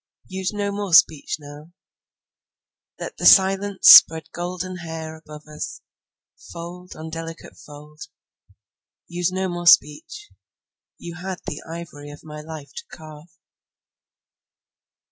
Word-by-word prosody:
Use 190 0 -4
no 205 -1 -3
more 200 -4 0
speech 160 -2 +3
now; 150 +3 -13 1.3
Let - - -8
the - - -5
silence 195 +1 +4
spread 160 -1 +7
gold 175 +1 -5 0.2
hair 160 -1 -7
above 150 -1 -13
us, 150 0 -8 0.7
Fold 175 +1 -10
on 160 +1 -9
delicate 165 0 -9
fold. 150 +1 -15 1.1
Use 175 +1 -2
no 190 +1 -2
more 175 -1 -5
speech; 170 - +2 0.7
You 170 0 -10
had 185 +1 -6
the - - -6
ivory 160 -3 -9
of 145 - -13
my 150 -1 -10
life 155 -2 -10
to 470 - -6
carve. 155 0 -13
165 Hz, 120 wpm, -22 LUFS, 155-180 Hz, 1.3 s, spread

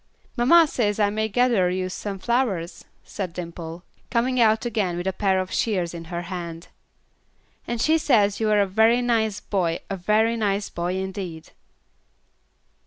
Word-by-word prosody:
"Mamma 320 +8 +6
says 220 -8 -1
I 205 -1 +3
may 220 +1 -1
gather 235 -5 +2
you 185 0 -2
some 195 +2 -5
flowers," 195 -5 -1 0.2
said 185 -4 -5
Dimple, 170 -1 -7 0.3
coming 250 +1 +1
out 220 +1 +3
again 205 -7 -1
with 175 - -4
a 190 - 0
pair 190 -1 +1
of 185 0 -4
shears 185 -7 0
in 165 -1 -7
her 170 +1 -5
hand, 170 -2 -7 1.0
"and 235 -1 -3
she 315 +6 +3
says 210 -9 +2
you 220 -1 +1
are 210 -1 +4
a - - +3
very 220 +5 +3
nice 220 -4 +1
boy, 175 -4 -1
a 195 - -2
very 215 +5 +2
nice 205 -2 -1
boy 175 +2 -2
indeed." 190 -4 -5
200 Hz, 165 wpm, -24 LUFS, 180-225 Hz, 1.0 s, Mamma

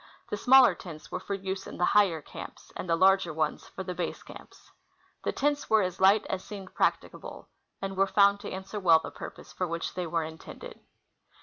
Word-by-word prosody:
The - - 0
smaller 255 +4 +6
tents 160 -4 -11
were - - -3
for 200 +2 -4
use 190 0 -5
in - - -8
the 175 - +2
higher 180 -7 +3
cami)s, - - -10
and 185 - -6
the 165 - +4
larger 190 0 +4
ones 155 -1 -2
for 190 - -7
the 180 -1 -4
l.)ase 175 -2 -4
camps. - - -14 0.5
The - - 0
tents 290 +1 -1
were 220 -2 +5
as 185 0 -4
light 195 +3 +5
as 190 -1 -3
seemed 195 -2 -9
practicable, - - -2 0.3
and 195 0 -3
were 195 +1 +3
found 200 0 +4
to - - -7
answer 190 +2 -5
well 170 -4 +6
the 160 - -6
purpose - - -10
for 180 - -2
which 165 0 -4
they 180 -1 -3
Avere 165 -1 -1
intended. 160 0 -10
190 Hz, 205 wpm, -28 LUFS, 170-200 Hz, 0.5 s, smaller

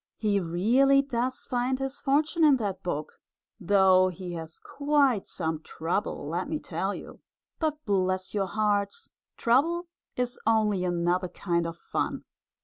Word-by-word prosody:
He 210 -2 +1
really 235 +11 +3
does 255 -1 -2
find 250 +1 0
his 270 +1 -4
fortune 310 +4 +2
in 295 -3 +7
that 200 -6 -3
book, 155 -4 -4 0.4
though 190 -1 +5
he 185 -1 -6
has 165 -1 -7
quite 285 -6 +1
some 160 -1 -3
trouble, 165 -1 -3
let 175 - -2
me 310 - -1
tell - - -3
you. - - -10 0.4
But 305 -2 -2
bless 185 -2 0
your 200 -2 0
hearts! 210 - -1 0.3
Trouble 325 +9 +2 0.3
is 250 -1 -2
only 215 -4 +2
another 175 +1 0
kind 170 -2 -1
of 165 0 -7
fun! - - -3
205 Hz, 140 wpm, -27 LUFS, 180-270 Hz, 0.4 s, in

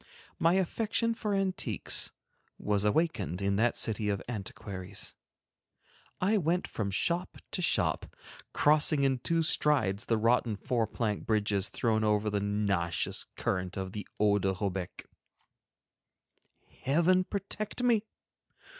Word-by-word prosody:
My 165 +1 +4
affection 225 +5 0
for 210 -2 -2
antiques 185 - 0 0.5
was 105 -1 0
awakened 105 - +1
in 100 0 +1
that 115 +2 +2
city 105 -1 0
of 100 -1 0
antiquaries. 100 -3 -5 1.1
I 205 +4 +3
went 175 +1 0
from 105 -3 -3
shop 170 - -1
to - - -2
shop, 170 - +1 0.4
crossing 150 -1 +4
in 135 -2 +2
two 165 +6 +1
strides 125 -10 +2
the 115 - +1
rotten 115 0 +2
four 115 +2 -1
plank 110 -1 -2
bridges 105 -2 +1
thrown 110 -3 +1
over 105 0 +2
the 100 -1 0
nauseous 100 -5 0
current 90 -1 -2
of 95 -1 -3
the 105 +1 -6
"Eau 105 -1 +4
de 95 0 +1
Robec." 95 -2 -4 1.8
Heaven 170 +7 +3
protect 205 +4 -4
me! 235 -4 +3
110 Hz, 125 wpm, -30 LUFS, 100-170 Hz, 1.8 s, My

